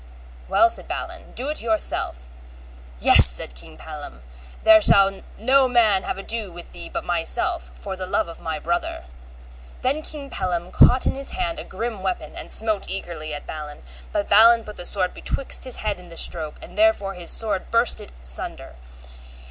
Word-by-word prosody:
Well, 340 Hz, -, +5 dB
said -, -, -3 dB
Balin, -, -, -7 dB
do 265 Hz, +4 st, +1 dB
it 305 Hz, -, +1 dB
yourself. 215 Hz, -, -1 dB, 0.7 s
Yes, -, -, +8 dB
said 60 Hz, 0 st, +1 dB
King -, -, -12 dB
Pellam, 65 Hz, -1 st, -10 dB, 0.4 s
there 330 Hz, 0 st, +7 dB
shall 195 Hz, -8 st, +5 dB, 0.2 s
no 260 Hz, +4 st, +3 dB
man 225 Hz, -6 st, +3 dB
have -, -, -4 dB
ado 210 Hz, 0 st, -2 dB
with 175 Hz, 0 st, -12 dB
thee -, -, -9 dB
but -, -, -5 dB
myself, 325 Hz, -, -1 dB
for 195 Hz, -2 st, -7 dB
the 185 Hz, -1 st, -6 dB
love -, -, 0 dB
of 165 Hz, -, -11 dB
my 160 Hz, -1 st, -4 dB
brother. 170 Hz, +3 st, -3 dB, 0.8 s
Then 280 Hz, +4 st, 0 dB
King 285 Hz, -3 st, -8 dB
Pellam 180 Hz, -2 st, -3 dB
caught 255 Hz, +1 st, +5 dB
in -, -, +1 dB
his 275 Hz, 0 st, -5 dB
hand 340 Hz, -4 st, -3 dB
a -, -, -6 dB
grim 230 Hz, -4 st, -6 dB
weapon 185 Hz, -1 st, -4 dB
and -, -, -7 dB
smote 215 Hz, -3 st, +2 dB
eagerly 170 Hz, -5 st, -5 dB
at 145 Hz, -, -9 dB
Balin; 150 Hz, -1 st, -8 dB, 0.3 s
but 205 Hz, -1 st, -2 dB
Balin 230 Hz, +3 st, +6 dB
put 210 Hz, -1 st, -11 dB
the 175 Hz, -, -1 dB
sword 185 Hz, -2 st, 0 dB
betwixt 275 Hz, -, -1 dB
his 255 Hz, -, -2 dB
head 210 Hz, -3 st, -4 dB
and 180 Hz, -1 st, -15 dB
the 165 Hz, -, -11 dB
stroke, 155 Hz, -3 st, +1 dB
and -, -, -13 dB
therewith 205 Hz, -, +1 dB
his 170 Hz, -, -6 dB
sword 210 Hz, -4 st, 0 dB
burst 230 Hz, +1 st, +3 dB
in -, -, -11 dB
sunder. -, -, -4 dB
200 Hz, 180 wpm, -22 LUFS, 175-245 Hz, 0.8 s, Yes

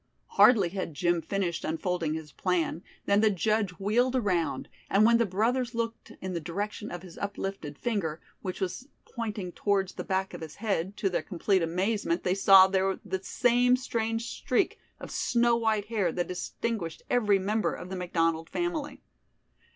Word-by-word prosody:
Hardly 205 Hz, -8 st, +6 dB
had 175 Hz, -4 st, -4 dB
Jim 175 Hz, 0 st, +1 dB
finished 175 Hz, 0 st, -2 dB
unfolding 165 Hz, -1 st, -1 dB
his 160 Hz, -2 st, -7 dB
plan, 175 Hz, -2 st, -1 dB, 0.2 s
than 200 Hz, +1 st, +3 dB
the 220 Hz, -, +5 dB
judge 210 Hz, +1 st, +1 dB
wheeled 240 Hz, +6 st, +2 dB
around, 190 Hz, -9 st, 0 dB, 0.2 s
and 205 Hz, +2 st, +5 dB
when 235 Hz, 0 st, +5 dB
the 230 Hz, -, +2 dB
brothers 235 Hz, +5 st, 0 dB
looked 230 Hz, 0 st, -4 dB
in 185 Hz, 0 st, -4 dB
the 170 Hz, -, -1 dB
direction 205 Hz, +6 st, -4 dB
of 175 Hz, 0 st, -7 dB
his 180 Hz, -3 st, -11 dB
uplifted 195 Hz, -7 st, -4 dB
finger, 190 Hz, -10 st, -2 dB, 0.2 s
which 185 Hz, -2 st, -4 dB
was 190 Hz, +8 st, -3 dB, 0.2 s
pointing 210 Hz, -6 st, -4 dB
towards 195 Hz, 0 st, 0 dB
the -, -, -5 dB
back 190 Hz, 0 st, -1 dB
of -, -, -7 dB
his 160 Hz, -2 st, -8 dB
head, 200 Hz, -2 st, -2 dB
to 195 Hz, -, 0 dB
their 180 Hz, -, 0 dB
complete 185 Hz, +4 st, 0 dB
amazement 180 Hz, +2 st, 0 dB
they 180 Hz, -, +2 dB
saw 195 Hz, -1 st, +8 dB
there 190 Hz, 0 st, 0 dB
the 190 Hz, -1 st, -3 dB
same 245 Hz, +3 st, +3 dB
strange 230 Hz, -2 st, -2 dB
streak -, -, 0 dB, 0.2 s
of -, -, -8 dB
snow 235 Hz, 0 st, +2 dB
white 220 Hz, -3 st, +1 dB
hair 210 Hz, -6 st, 0 dB
that 175 Hz, +2 st, -2 dB
distinguished 180 Hz, -1 st, -4 dB
every 210 Hz, -5 st, +3 dB
member 210 Hz, +3 st, 0 dB
of 180 Hz, -, -8 dB
the -, -, -3 dB
McDonald 165 Hz, -2 st, 0 dB
family. 340 Hz, -4 st, -3 dB
195 Hz, 170 wpm, -28 LUFS, 175-225 Hz, 0.2 s, saw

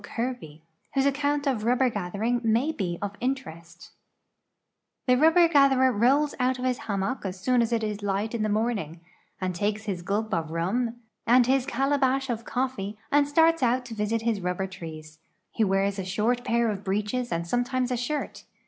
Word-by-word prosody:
Kerbev, 230 Hz, -11 st, -5 dB, 0.3 s
wliose 270 Hz, 0 st, +3 dB
account 285 Hz, +1 st, +1 dB
of 260 Hz, -6 st, 0 dB
rul)l)er 250 Hz, +4 st, +2 dB
gathering 205 Hz, +5 st, -1 dB
may 230 Hz, +7 st, +2 dB
be 180 Hz, -, -3 dB
of 200 Hz, 0 st, -3 dB
inti 260 Hz, +1 st, -1 dB
rcst: 170 Hz, +1 st, -13 dB, 0.6 s
" -, -, -56 dB
The 250 Hz, -, +5 dB
rubber 325 Hz, +5 st, +5 dB
gatherer 275 Hz, -4 st, +4 dB
rolls 265 Hz, +7 st, +2 dB
out 255 Hz, 0 st, +1 dB
of 250 Hz, -, -4 dB
his 250 Hz, -1 st, 0 dB
hammock 200 Hz, +5 st, -1 dB
as 190 Hz, -1 st, -5 dB
soon 250 Hz, +5 st, +2 dB
as 230 Hz, 0 st, 0 dB
it 230 Hz, -1 st, 0 dB
is 210 Hz, -1 st, -3 dB
light 205 Hz, +2 st, -1 dB
in 235 Hz, -, -2 dB
the 215 Hz, -, 0 dB
morning, 210 Hz, -7 st, -1 dB, 0.4 s
and 185 Hz, -1 st, -2 dB
takes 210 Hz, +4 st, -1 dB
his 195 Hz, -5 st, -3 dB
gul}) 200 Hz, +5 st, -1 dB
of 160 Hz, -2 st, -1 dB
rum 210 Hz, +9 st, -1 dB, 0.3 s
and 245 Hz, +1 st, +6 dB
his 265 Hz, +1 st, +2 dB
cala 275 Hz, +2 st, +1 dB
bash 270 Hz, 0 st, +1 dB
of 230 Hz, 0 st, -4 dB
coffee 230 Hz, -6 st, -3 dB
and 290 Hz, 0 st, +4 dB
starts 325 Hz, +2 st, +3 dB
out 250 Hz, 0 st, +1 dB
to 240 Hz, -, -8 dB
visit 220 Hz, +1 st, -1 dB
his 225 Hz, -4 st, 0 dB
rubber 180 Hz, +2 st, -2 dB
trees. 155 Hz, -4 st, -9 dB, 0.3 s
He 225 Hz, -, 0 dB
wears 195 Hz, 0 st, +1 dB
a -, -, -2 dB
short 220 Hz, +6 st, 0 dB
pair 235 Hz, -2 st, +1 dB
of 200 Hz, -1 st, -6 dB
breeches 210 Hz, +6 st, -2 dB
and 170 Hz, 0 st, -2 dB
sometimes 245 Hz, +4 st, 0 dB
a -, -, +1 dB
shirt. 285 Hz, +5 st, -4 dB
230 Hz, 195 wpm, -26 LUFS, 195-255 Hz, 0.6 s, and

